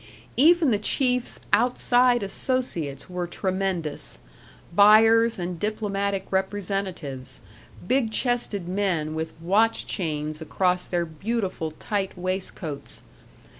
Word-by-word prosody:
Even 320 +1 +5
the 210 - +2
chiefs' 250 +3 +1
outside 245 +1 +3
associates 190 - -2
were 180 -1 -4
tremendous, 185 -4 -2 0.6
buyers 225 +4 +6
and 175 -1 -4
diplomatic 200 -2 -1
representatives; 190 -8 -3 0.5
big 255 -1 +2
chested 220 -6 0
men 180 -5 -1
with 160 0 -5
watch 205 +7 +2
chains 155 -3 -3
across 180 +3 0
their 175 -1 0
beautiful 185 0 -3
tight 190 +5 -3
waistcoats. 180 -5 -5
195 Hz, 95 wpm, -25 LUFS, 170-225 Hz, 0.6 s, buyers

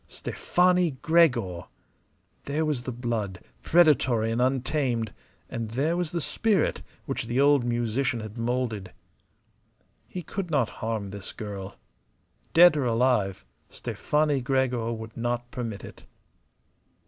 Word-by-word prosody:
Stefani 180 -5 +1
Gregor! 125 - +3 0.8
There 150 +3 0
was 150 -5 -1
the 125 - -5
blood, 115 -6 -3 0.2
predatory 130 -9 +4
and 115 +2 0
untamed; 130 -3 0 0.3
and 115 -1 -4
there 140 +9 0
was 175 -3 -2
the 170 - -1
spirit 205 +2 +1 0.2
which 115 - -3
the 120 +2 0
old 140 -2 +5
musician 120 +1 0
had 110 -1 -7
moulded. 115 -5 -2 1.1
He 180 - -6
could 195 0 -4
not 140 -8 +2
harm 110 -3 -2
this 100 0 -6
girl. 100 -2 -7 0.8
Dead 175 -1 +8
or 145 -3 0
alive, 115 - +1 0.2
Stefani 150 -2 0
Gregor 125 -3 0
would 110 -1 -7
not 120 +1 -2
permit 115 -6 -5
it. - - -11
125 Hz, 125 wpm, -27 LUFS, 115-150 Hz, 1.1 s, Dead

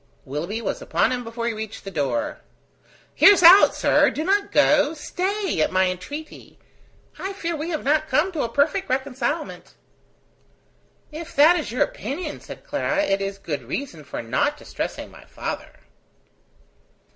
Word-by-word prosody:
Willoughby 170 - -4
was - - -3
upon - - +1
him 250 -1 -2
before 230 0 -5
he 235 - 0
reached 220 0 -7
the 195 - -7
door. 290 - -2 0.7
"Hear 405 - +8
us 360 - 0
out, 360 +4 +8
sir. - - +3
Do 310 - -4
not 400 +3 +1
go. 295 +1 +3
Stay, 375 - -2
at - - +1
my 185 0 +2
entreaty. 290 - -9 0.6
I 390 +1 -4
fear 340 -4 -3
we 310 +2 -4
have 315 -3 -3
not 310 +3 +1
come 345 +6 +2
to 320 -5 -3
a 235 - -1
perfect 310 +10 0
reconcilement." 265 +3 -3 1.4
"If 315 +2 -8
that 310 +5 +7
is 310 -9 -3
your 250 - +2
opinion," 300 +2 -5
said - - -11
Clara, 300 0 0
"it 195 -9 0
is 195 0 -3
good 160 -7 -4
reason 215 - -6
for 140 - -6
not 130 - 0
distressing - - -6
my - - -15
father." - - -6
290 Hz, 160 wpm, -23 LUFS, 220-330 Hz, 1.4 s, Hear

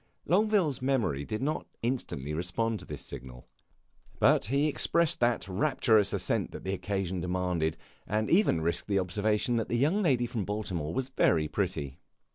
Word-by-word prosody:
Longueville's 190 - +2
memory 120 - 0
did 110 - -3
not 155 +3 -2 0.2
instantly 95 - -2
respond 105 +7 -1
to - - -11
this - - -6
signal, 60 -1 -9 0.7
but - - +4
he 140 +7 +2
expressed 170 +2 +2
that 120 -4 +1
rapturous 110 0 +2
assent - - -1
which - - -8
the 95 - -2
occasion 95 -2 -2
demanded, 90 -3 -1 0.3
and 110 +1 0
even 175 - +3
risked 85 +1 -1
the 100 -1 +1
observation 105 +5 +1
that 115 - -2
the 120 - +1
young 155 - +2
lady 130 -10 +2
from 115 -3 -3
Baltimore 95 -7 -3
was 130 +7 -2
very 80 - +2
pretty. 80 -8 -3
105 Hz, 160 wpm, -29 LUFS, 90-130 Hz, 0.7 s, but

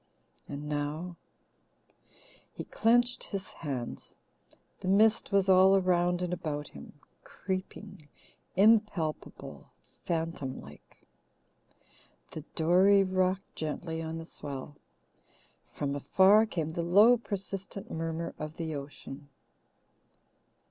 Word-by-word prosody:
And 145 +1 -6
now 150 +4 -3 0.6
" - - -26
He - - -4
clenched 240 +2 +2
his 195 -2 -5
hands. 135 -7 -6 0.6
The - - -6
mist 215 +4 +3
was 195 -1 +3
all 190 +1 +6
around 180 -1 +2
and 180 0 -2
about 150 -4 -4
him, 70 0 -12 0.3
creeping, 190 -2 -6 0.5
impalpable, 200 -6 +1 0.4
phantom 165 -5 -2
like. 70 +2 -15 1.3
The 155 - -6
dory 185 +5 +5
rocked 185 +1 -1
gently 160 +1 -4
on 160 0 -5
the 165 - -7
swell. 145 -2 -8 1.0
From 140 -1 -3
afar 190 +10 +5
came 160 -6 -3
the 170 - -2
low 205 +8 +6
persistent 195 -3 -5
murmur 165 +1 -3
of 155 +1 -6
the 160 -2 -3
ocean. 140 0 -8
175 Hz, 105 wpm, -30 LUFS, 155-195 Hz, 1.3 s, all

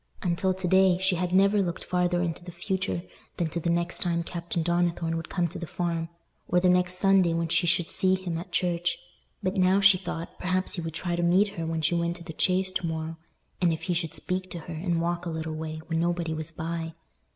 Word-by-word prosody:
Until 185 +1 +1
to 190 -1 -2
day, 190 0 +5
she 190 0 +2
had 180 0 -1
never 200 +2 +4
looked 175 -3 -2
farther 180 -1 +1
into 170 0 -3
the 175 - -8
future 180 0 -2 0.3
than 170 -3 0
to 170 +2 -2
the 170 - -1
next 170 +1 0
time 170 -1 +1
Captain 170 0 -3
Donnithorne 170 -1 +1
would 165 0 -4
come 175 -2 +1
to 180 +2 -7
the 170 - -5
Farm, 170 -1 -2 0.4
or 180 - +3
the 180 0 +3
next 180 0 +3
Sunday 190 -3 +4
when 165 0 -1
she 175 +2 +2
should 165 0 +2
see 185 -1 +2
him 185 -3 -4
at 180 +2 -9
church; 175 -1 0 0.5
but 185 0 0
now 185 +1 +4
she 195 -2 +6
thought, 175 -2 -6
perhaps 185 +1 0
he 175 - -2
would 165 -1 -5
try 175 +1 -1
to 175 - -1
meet 185 +4 +4
her 165 -4 -5
when 160 -1 -2
she 160 - +2
went 170 0 0
to 175 - -10
the 165 -1 -8
Chase 185 +3 +2
to 185 -2 -1
morrow—and 160 +2 -3
if 160 - -3
he 180 - 0
should 165 -2 -2
speak 185 0 -3
to 170 - -6
her, 170 - -7
and 170 +1 -1
walk 175 +1 -1
a - - -1
little 160 -1 -3
way, 155 0 -5
when 165 -1 -1
nobody 170 -1 0
was 155 0 -3
by! 165 0 -4
175 Hz, 235 wpm, -27 LUFS, 165-185 Hz, 0.5 s, she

